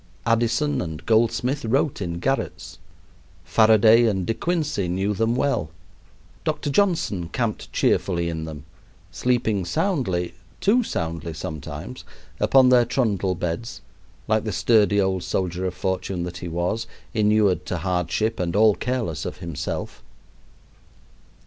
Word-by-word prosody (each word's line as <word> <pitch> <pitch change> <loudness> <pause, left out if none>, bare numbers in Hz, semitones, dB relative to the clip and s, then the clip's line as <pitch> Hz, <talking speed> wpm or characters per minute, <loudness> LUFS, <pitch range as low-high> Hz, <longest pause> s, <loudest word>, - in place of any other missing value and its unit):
Addison 115 +6 +1
and 80 -1 -6
Goldsmith 120 +5 +1
wrote 130 +2 0
in 85 -2 -3
garrets. 135 +10 -3 0.7
Faraday 110 +1 +5
and 95 -4 0
De 115 - 0
Quincey 150 - -1
knew 95 +4 0
them 115 +3 +1
well. 125 - 0 0.7
Dr. 145 - -2
Johnson 140 - +1
camped 115 -1 -3
cheerfully 85 -3 +1
in 80 -1 -3
them, 75 -2 -8 0.5
sleeping 115 -6 0
soundly 95 - -1 0.3
too 225 +5 +3
soundly 85 - -3
sometimes 80 -2 -7 0.4
upon 130 -1 +5
their 125 -1 +6
trundle 105 -7 0
beds, 90 +8 -4 0.5
like 110 -1 +2
the 110 - -3
sturdy 105 0 +3
old 95 -2 +1
soldier 90 0 -2
of 90 - -5
fortune 95 -1 -2
that 90 0 -5
he 90 - -6
was, 90 +7 -2 0.3
inured 105 -5 +3
to - - -2
hardship 90 +5 -1
and 90 0 -1
all 110 0 +6
careless 120 - -2
of - - -5
himself. 85 -4 -5
105 Hz, 130 wpm, -23 LUFS, 90-120 Hz, 0.7 s, their